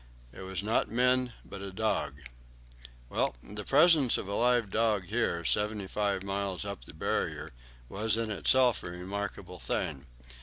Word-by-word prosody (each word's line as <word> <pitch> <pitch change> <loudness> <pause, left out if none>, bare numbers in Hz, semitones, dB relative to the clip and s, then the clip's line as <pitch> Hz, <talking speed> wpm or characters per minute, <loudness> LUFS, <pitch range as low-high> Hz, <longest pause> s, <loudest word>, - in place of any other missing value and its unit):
It - - -10
was 95 0 -4
not 110 +2 +1
men, 125 +1 +2
but 100 - -9
a 100 -1 -6
dog. 85 -9 -1 0.9
Well, - - -1
the 105 +1 -6
presence 150 -2 +5
of - - -5
a 100 - -3
live 120 -2 +2
dog 110 -4 +2
here, 105 -7 0
seventy 105 +1 +1
five 100 -1 -1
miles 100 -1 -2
up 100 -12 -6
the - - -11
Barrier, - - -2 0.4
was 105 - 0
in 115 -1 -2
itself 125 +4 +3
a - - -6
remarkable 95 +3 -5
thing. 70 +1 -3
105 Hz, 155 wpm, -30 LUFS, 95-115 Hz, 0.9 s, presence